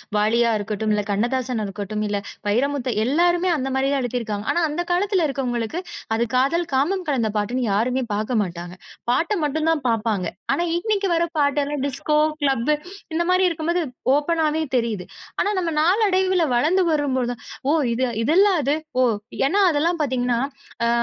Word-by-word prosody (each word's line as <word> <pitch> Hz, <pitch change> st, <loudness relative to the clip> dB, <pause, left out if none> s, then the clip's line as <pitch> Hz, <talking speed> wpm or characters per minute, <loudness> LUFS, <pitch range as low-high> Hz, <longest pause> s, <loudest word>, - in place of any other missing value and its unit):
வாலியா 230 Hz, +3 st, +3 dB
இருக்கட்டும், 215 Hz, +1 st, -2 dB
இல்ல 210 Hz, -, +1 dB
கண்ணதாசனா 240 Hz, +2 st, 0 dB
இருக்கட்டும், 210 Hz, +2 st, -4 dB
இல்ல, 205 Hz, 0 st, -1 dB, 0.3 s
வைரமுத்து. 255 Hz, +4 st, 0 dB
எல்லாருமே 345 Hz, +6 st, +2 dB
அந்த 270 Hz, 0 st, -2 dB
மாதிரி 270 Hz, +1 st, +1 dB
எழுதி 245 Hz, -1 st, -2 dB
இருக்காங்க. 210 Hz, -2 st, -4 dB
ஆனா, 345 Hz, -, +1 dB
அந்தக் 345 Hz, +4 st, -3 dB
காலத்துல 375 Hz, -1 st, +2 dB
இருக்குறவங்களுக்கு, 250 Hz, +3 st, -2 dB, 0.3 s
அது 235 Hz, +1 st, 0 dB
காதல், 330 Hz, +7 st, +2 dB
காமம் 360 Hz, +8 st, +1 dB
கலந்த 230 Hz, -6 st, +1 dB
பாட்டுன்னு 240 Hz, +4 st, -1 dB
யாருமே 250 Hz, +5 st, +1 dB
பார்க்கமாட்டாங்க. 185 Hz, -5 st, -2 dB, 0.3 s
பாட்டு 340 Hz, -, +1 dB
மட்டும் 310 Hz, +2 st, 0 dB
தான் 300 Hz, -5 st, -1 dB
பார்ப்பாங்க. 215 Hz, -4 st, 0 dB, 0.3 s
ஆனா, 345 Hz, -, 0 dB
இன்னைக்கு 400 Hz, -1 st, 0 dB
வரப் 335 Hz, 0 st, -1 dB
பாட்டு 285 Hz, 0 st, +2 dB
எல்லாம் 290 Hz, -2 st, -3 dB
டிஸ்கோ, 300 Hz, +3 st, -1 dB, 0.3 s
கிளப்பு 270 Hz, +1 st, +2 dB, 0.4 s
இந்த 340 Hz, -, +1 dB
மாதிரி 370 Hz, 0 st, +4 dB
இருக்கும்போது 335 Hz, +1 st, -1 dB, 0.3 s
ஓப்பனாவே 315 Hz, +1 st, +1 dB
தெரியுது. 220 Hz, -6 st, -2 dB, 0.3 s
ஆனா, 410 Hz, -, +2 dB
நாம 330 Hz, -3 st, -2 dB
நாள் 390 Hz, +7 st, +3 dB
அடைவுல 370 Hz, -3 st, +2 dB
வளர்ந்து 345 Hz, +9 st, +3 dB
வரும் 285 Hz, -3 st, 0 dB
போழுது, 245 Hz, -1 st, -2 dB, 0.3 s
ஓ -, -, +4 dB, 0.2 s
இது 255 Hz, +1 st, +1 dB, 0.2 s
இதுல்ல 360 Hz, -, +5 dB, 0.2 s
அது. 285 Hz, +3 st, +1 dB, 0.2 s
ஓ -, -, +5 dB, 0.4 s
ஏன்னா 395 Hz, +8 st, +1 dB
அதெல்லாம் 320 Hz, +2 st, +1 dB
பாத்தீங்கன்னா, 245 Hz, -3 st, 0 dB, 0.5 s
அ -, -, +2 dB
275 Hz, 155 wpm, -22 LUFS, 230-335 Hz, 0.5 s, இதுல்ல